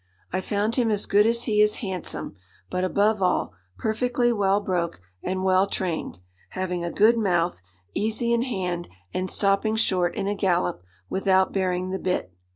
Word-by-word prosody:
I 185 - 0
found 210 +5 -1
him 240 -3 +3
as 210 -2 0
good 205 +2 +4
as 235 +1 +1
he 210 -2 +2
is 210 0 +4
handsome; 185 - -5 0.4
but, 180 - -1
above 205 +3 +2
all, 180 - +1 0.2
perfectly 240 - +1
well 200 -2 +2
broke 175 - -2 0.2
and 185 +1 -2
well 190 +1 +4
trained, 180 -4 -3 0.3
having 180 -2 -3
a 170 - -1
good 225 +6 +4
mouth, 175 - +1 0.3
easy 220 +3 0
in 235 - +2
hand, 180 -8 -3 0.2
and 185 0 -1
stopping 200 +2 +2
short 185 -5 +1
in - - -2
a 205 - +1
gallop 175 - 0 0.3
without 190 0 +2
bearing 185 -1 0
the 190 - -2
bit. 180 - -2
195 Hz, 165 wpm, -25 LUFS, 180-215 Hz, 0.4 s, good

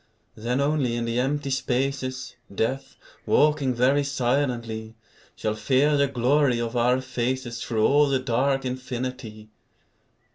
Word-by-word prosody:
Then 120 +4 -2
only 140 -4 +1
in 120 0 -2
the 115 +1 -1
empty 140 +2 -1
spaces, 130 0 -2 0.2
Death, 120 +7 -2 0.3
walking 150 -3 +3
very 135 +4 +3
silently, 120 -5 -1 0.4
Shall 110 - -2
fear 135 +7 +2
the 140 0 +3
glory 130 0 +2
of 120 +1 -3
our 125 +2 +2
faces 125 -2 -3
Through 110 -2 +1
all 145 +1 +4
the 135 -1 +2
dark 130 +2 0
infinity. 125 -4 -5
130 Hz, 130 wpm, -25 LUFS, 120-140 Hz, 0.4 s, all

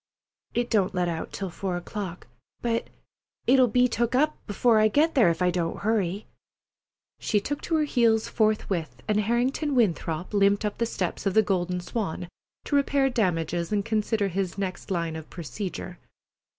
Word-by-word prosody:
"It 240 0 0
don't 195 -4 +2
let 180 -1 +1
out 165 -1 -3
till 195 -3 -4
four 185 0 -3
o'clock—but 205 +5 -5 0.6
it'll 255 0 +5
be 250 +2 +3
took 235 0 0
up 305 +4 +3 0.2
'fore 225 +2 +4
I 215 - +5
get 300 +9 +2
there 235 -10 +5
if 170 +2 0
I 180 - +3
don't 170 -2 -2
hurry." 205 -2 0 0.9
She 210 - +1
took 285 +8 -4
to 330 - -1
her 310 - +3
heels 230 -6 +2
forthwith, 195 - -1
and 210 0 +2
Harrington 250 +7 0
Winthrop 175 -6 0
limped 200 +1 +3
up 210 - -3
the 235 - +1
steps 190 -2 -2
of 195 - 0
the 220 - +6
Golden 180 -2 -1
Swan 175 -3 -4 0.4
to 290 - 0
repair 280 -1 +2
damages 175 -5 0
and 205 -1 0
consider 215 -2 0
his 190 0 -2
next 190 -2 -4
line 170 -3 -1
of 160 -1 -8
procedure. 180 +1 -6
205 Hz, 165 wpm, -26 LUFS, 180-235 Hz, 0.9 s, the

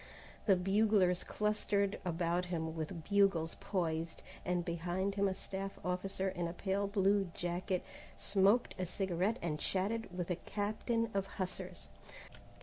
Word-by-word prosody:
The 195 - +7
buglers 195 -1 +3
clustered 210 -1 0
about 175 0 0
him 160 -2 -2
with 160 +1 -4
bugles 195 -5 +3
poised, 165 -3 -1 0.2
and 175 -1 0
behind 175 +3 -1
him 200 0 +2
a 190 - -1
staff 195 0 -5
officer 190 +1 -1
in 175 -2 -1
a 170 - -4
pale 195 +2 0
blue 200 -1 +3
jacket 175 +1 -1 0.3
smoked 200 +4 +3
a 185 - -1
cigarette 190 +3 0
and 155 -3 -1
chatted 210 +6 0
with 180 0 -3
a 175 - 0
captain 220 +3 -1
of 195 -1 0
hussars. 185 -1 -4
190 Hz, 140 wpm, -35 LUFS, 175-200 Hz, 0.3 s, The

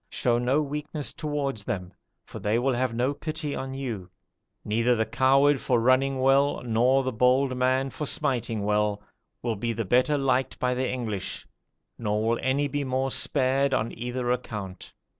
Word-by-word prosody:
Show 120 -1 +1
no 130 +5 +2
weakness 150 +1 -4
towards 145 -7 -3
them, 90 -2 -4 0.3
for - - -9
they 105 +2 +1
will 130 +2 +1
have 125 0 0
no 125 +4 0
pity 155 0 -4
on 135 0 -5
you. 115 -9 -5 0.6
Neither 115 +3 +2
the 110 -1 +1
coward 135 +2 +3
for 125 -2 +2
running 130 +3 +3
well, 135 +1 +3
nor 125 +3 +3
the 130 - -1
bold 130 +3 +2
man 130 +1 +1
for 150 - -4
smiting 120 -8 -1
well, 105 0 0 0.4
will 115 -2 -1
be 115 +3 -2
the 115 0 -3
better 125 +8 +3
liked 135 -1 0
by 125 0 0
the 130 +1 -1
English, 110 -6 -4 0.5
nor 105 0 0
will 115 +1 +1
any 140 +2 +1
be 145 +1 -2
the - - -3
more 130 +1 0
spared 135 0 +1
on 115 -2 -2
either 120 +1 -2
account. 105 -7 -5
130 Hz, 175 wpm, -26 LUFS, 115-135 Hz, 0.6 s, coward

